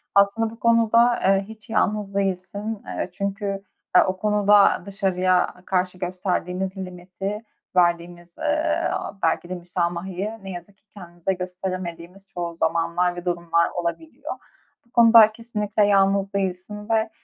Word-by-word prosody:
aslında 200 +3 +4
bu 225 - -13
konuda, 230 +1 +4
eee, 195 0 +3
hiç 220 0 -13
yalnız 210 -2 0
değilsin. 200 +2 -2
Eee, - - -4
çünkü 200 0 -3 0.3
ya, 180 - +7
o 185 0 -1
konuda 205 0 +4
dışarıya 185 -2 +1
karşı 185 -1 0
gösterdiğimiz 185 +1 -2
limiti, 190 +3 -6 0.3
verdiğimiz, 175 0 0
eee, 310 +1 0 0.3
belki 165 +2 +1
de 185 - -3
müsamahayı 180 +4 -3
ne 195 - -8
yazık 180 +3 -9
ki - - -38
kendimize 175 -1 -4
gösteremediğimiz 180 0 -6
çoğu 170 -2 -5
zamanlar 170 +2 0
ve 175 +1 -8
durumlar 170 -1 +1
olabiliyor. 175 - -4 0.5
Bu 235 - -32
konuda 230 -2 +7
kesinlikle 215 -2 -1
yalnız 195 0 +3
değilsin 200 +2 -3
ve 220 -1 +2
195 Hz, 130 wpm, -23 LUFS, 180-210 Hz, 0.5 s, ya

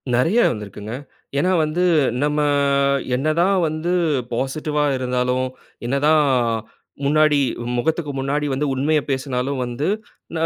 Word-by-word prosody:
நிறைய 165 - +3
வந்திருக்கிங்க. 105 0 -7 0.4
ஏன்னா 180 +6 +2
வந்து, 155 +4 0 0.4
நம்ம 150 0 0 0.8
என்னதான் 165 +8 +2
வந்து 155 +3 -2 0.4
பாசிட்டிவா 150 +4 -1
இருந்தாலும், 125 0 0 0.4
என்னதான் 150 +4 +3 0.8
முன்னாடி 155 0 +4 0.4
முகத்துக்கு 155 +3 -1
முன்னாடி 140 +2 -1
வந்து 140 +3 -1
உண்மைய 150 +3 +1
பேசுனாலும் 130 0 -2
வந்து, 125 +6 -3 0.6
ஆ - - +4
145 Hz, 105 wpm, -21 LUFS, 130-155 Hz, 0.8 s, முன்னாடி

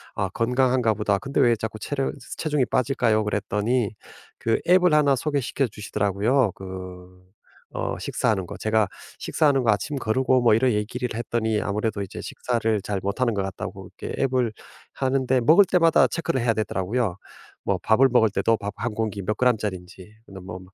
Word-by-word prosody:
"아 100 - -1
건강한가 125 +1 +1
보다. 105 -1 +1
근데 135 +3 -1
왜 120 -1 +4
자꾸 110 0 -5
체력 135 +3 -2 0.2
체중이 150 -4 0
빠질까요?" 120 -4 +1
그랬더니 105 +3 0 0.5
그 115 -1 +1
앱을 180 -2 +5
1 145 -2 +4
소개시켜 140 -1 -1
주시더라고요. 105 +3 0
그 90 -1 -10 0.5
어 - - -3
식사하는 95 -5 -1
거. - - -7
제가 110 -1 +1 0.3
식사하는 140 -4 +2
거 115 - +4
아침 120 +8 -2
거르고 130 +2 +1
뭐 115 -3 +5
이런 125 +2 +3
얘기를 115 +4 -2
했더니 110 -1 -1
아무래도 105 0 -2
이제 95 - -6
식사를 115 -3 -1
잘 100 -1 -3
못하는 115 +4 0
것 100 - -1
같다고 95 0 -6
이게 - - -7
앱을 125 -4 +1 0.4
하는데 130 -1 +1
먹을 165 +11 +6
때마다 165 -7 +4
체크를 140 -3 -2
해야 115 -1 +2
되더라고요. 100 0 -1 0.5
뭐 - - +2
밥을 125 +5 +5
먹을 115 -3 +4
때도 115 +2 +2
밥 100 0 -5
1 115 0 -3
공기 105 -2 -2
몇 105 +3 -2
그램짜리인지 105 -5 -2
너 95 -1 -10
뭐 90 0 -8
115 Hz, 360 characters per minute, -24 LUFS, 105-130 Hz, 0.5 s, 먹을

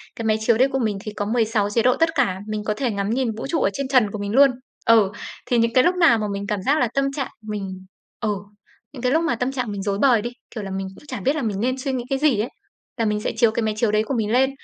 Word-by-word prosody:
Cái 230 - -5
máy 220 0 +2
chiếu 220 +1 +2
đấy 260 +3 +5
của 270 - 0
mình 215 -5 0
thì 215 -2 -6
có 205 - -2
16 220 -2 +1
chế 230 +3 +1
độ 250 0 +4
tất 330 0 +3
cả, 200 -10 +1
mình 215 -1 -3
có 210 0 0
thể 250 -1 0
ngắm 200 0 -2
nhìn 250 0 0
vũ 250 - -4
trụ 325 - 0
ở - - +3
trên 275 -1 -3
trần 250 -6 +3
của 210 - -5
mình 200 0 -3
luôn. 275 +3 +6 0.3
Ừ, 220 -4 +5 0.3
thì 245 - +1
những 230 0 +2
cái 255 - +5
lúc 355 +5 +3
nào 335 -10 +5
mà 215 -1 -2
mình 200 0 -4
cảm 205 -2 -2
giác 280 +9 +2
là 245 - +3
tâm 275 0 +1
trạng 275 -3 -2
mình 195 -3 -6 0.3
ừ, 215 - -1 0.6
những 255 - -8
cái 250 +1 +1
lúc 325 +2 +2
mà 325 - +1
tâm 250 +1 -1
trạng 250 -5 -3
mình 200 -1 -4
rối 200 -1 -1
bời 250 -6 +4
đi, 240 - -3 0.3
kiểu 215 - -4
là, 195 - -6
mình 190 0 -3
cũng - - -16
chẳng 255 - -6
biết 275 +4 +2
là 310 - -2
mình 210 -5 -2
nên 255 +3 0
suy 265 +1 -3
nghĩ 250 -2 -2
cái 270 - 0
gì 285 -7 +3
ấy, 230 +5 -1 0.5
là 230 - 0
mình 210 -1 0
sẽ - - -1
chiếu 235 -2 +4
cái 225 - -1
máy 215 -1 0
chiếu 215 -1 +2
đấy 215 0 +2
của 245 - -4
mình 220 -4 -1
lên. 265 +3 +4
230 Hz, 310 wpm, -22 LUFS, 210-260 Hz, 0.6 s, luôn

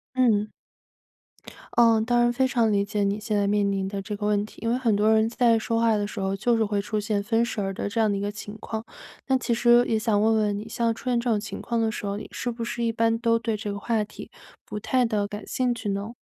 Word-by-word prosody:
嗯。 220 -5 +3 1.3
嗯， 230 -2 +4
当 240 0 +2
然 240 0 +3
非 260 +2 +1
常 230 -4 +2
理 200 -1 +2
解 205 0 -1
你 200 +1 0
现 215 0 -2
在 200 0 +1
面 205 -1 +2
临 195 -1 -1
的 195 0 -4
这 210 +1 -5
个 205 0 -4
问 205 0 +1
题。 - - -15
因 230 - -1
为 245 - +2
很 230 -5 +1
多 215 +2 +3
人 220 0 +3
在 235 -1 +3
说 230 +1 -1
话 230 -1 +3
的 205 0 0
时 - - -7
候， 195 0 -1
就 235 +4 +1
是 225 - +2
会 205 -1 -1
出 210 +1 -2
现 205 -1 -1
分 230 +2 +1
神 210 -4 -3
儿 195 0 -2
的 205 - -3
这 225 +2 -2
样 220 -1 +3
的 200 - -1
一 - - -3
个 205 0 -2
情 210 0 -8
况。 220 0 -5 0.4
那 265 -1 +3
其 240 -1 -1
实 240 +1 +5
也 220 - +1
想 215 -2 +1
问 220 +1 +3
问 210 -2 +1
你， 215 +2 -7
像 230 0 0
出 250 +3 -6
现 240 -1 +2
这 240 0 -2
种 215 -2 +2
情 220 - -7
况 235 -1 -1
的 220 -1 +1
时 210 - -6
候， 200 0 -2
你 215 - -7
是 245 - -3
不 230 0 -5
是 235 0 -3
一 230 - +1
般 230 0 +1
都 230 -1 +2
对 225 -1 -2
这 205 -1 -4
个 200 - -5
话 225 -1 0
题 210 - -10 0.4
不 210 - -5
太 250 +3 +1
地 210 -3 0
感 205 +1 -7
兴 250 -1 0
趣 225 -3 -5
呢？ 200 +4 -3
220 Hz, 300 characters per minute, -25 LUFS, 205-235 Hz, 1.3 s, 实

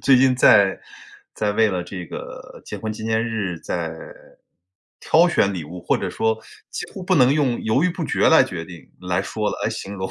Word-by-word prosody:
最 135 -1 +5
近 130 0 +4
在 100 -5 +5 0.5
在 105 -1 -1
为 110 +1 +3
了 90 -3 -2
这 90 -1 -7
个 - - -9
结 - - -7
婚 110 - -4
纪 110 0 -8
念 110 0 +1
日 105 -7 -3
在 85 -2 -3 1.1
挑 170 +3 +4
选 100 - +2
礼 90 -5 -5
物， 90 +4 -9
或 - - +1
者 - - -3
说 110 0 0 0.3
几 - - -5
乎 190 - -8
不 185 - +2
能 130 -4 +5
用 140 -5 0
犹 120 +8 +1
豫 180 - +2
不 170 -1 -4
决 - - +2
来 160 - +7
决 90 -10 -5
定 85 -1 -13
来 90 0 -1
说 105 +2 -2
了 - - -5
来 - - +2
形 100 +1 -6
容。 95 -1 -4
110 Hz, 230 characters per minute, -22 LUFS, 95-130 Hz, 1.1 s, 来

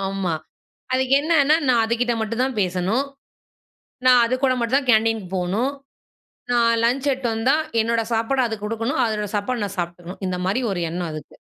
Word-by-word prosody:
ஆமா. 190 -4 -2 0.6
அதுக்கு 260 0 +1
என்னன்னா, 305 -1 +4
நான் 235 -3 +4
அதுகிட்ட 240 +1 0
மட்டும் 230 +3 -2
தான் 260 -2 -2
பேசணும். 185 +8 0 1.0
நான் 250 -1 +7
அதுக்கூட 255 +2 +1
மட்டும்தான் 260 +3 0
கேன்டீனுக்கு 220 -3 +2
போணும். 200 +10 0 0.8
நான் 230 -1 +3
லஞ்ச் 260 +4 +1
எடுத்துட்டு 250 -3 -1
வந்தா, 250 +6 +2 0.3
என்னோட 230 +1 +1
சாப்பாட 230 +4 0
அதுக்குடுக்கணும். 225 +5 -2
அதோட 210 -2 -2
சாப்பாடு 215 +2 -1
நான் 200 -1 -7
சாப்பிட்டுக்கணும். 175 +2 -6
இந்த 180 -1 -2
மாரி 240 +7 0
ஒரு 175 -2 -2
எண்ணம் 175 0 -3
அதுக்கு. 155 -1 -9
230 Hz, 150 wpm, -22 LUFS, 200-255 Hz, 1.0 s, நான்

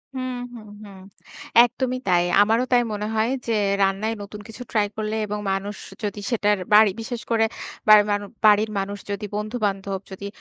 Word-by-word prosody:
হু, - - -3 0.3
হু, 235 - -9 0.2
হু। 205 - -11 0.8
একদমই 255 +1 -3
তাই। 175 -1 +4 0.2
আমারও 225 +4 +3
তাই 245 - +6
মনে 210 0 -3
হয় 220 +2 +2 0.2
যে, - - 0 0.3
রান্নায় 195 +3 0
নতুন 205 +1 -9
কিছু 225 +2 -11
ট্রাই 210 -2 +2
করলে 215 0 -2
এবং 210 0 -4
মানুষ 195 +2 -3 0.3
যদি 205 0 -3
সেটার 210 -2 +2 0.2
বাড়ি 210 -1 +7
বিশেষ 235 +1 -5
করে 225 -1 +3 0.4
বাড়ির 210 -1 +8
মানু 205 0 -1 0.2
বাড়ির 215 +1 +5
মানুষ 200 +1 -4
যদি, 200 +1 -3
বন্ধুবান্ধব 205 -3 -2
যদি 200 +1 -7
210 Hz, 165 wpm, -23 LUFS, 205-225 Hz, 0.8 s, বাড়ির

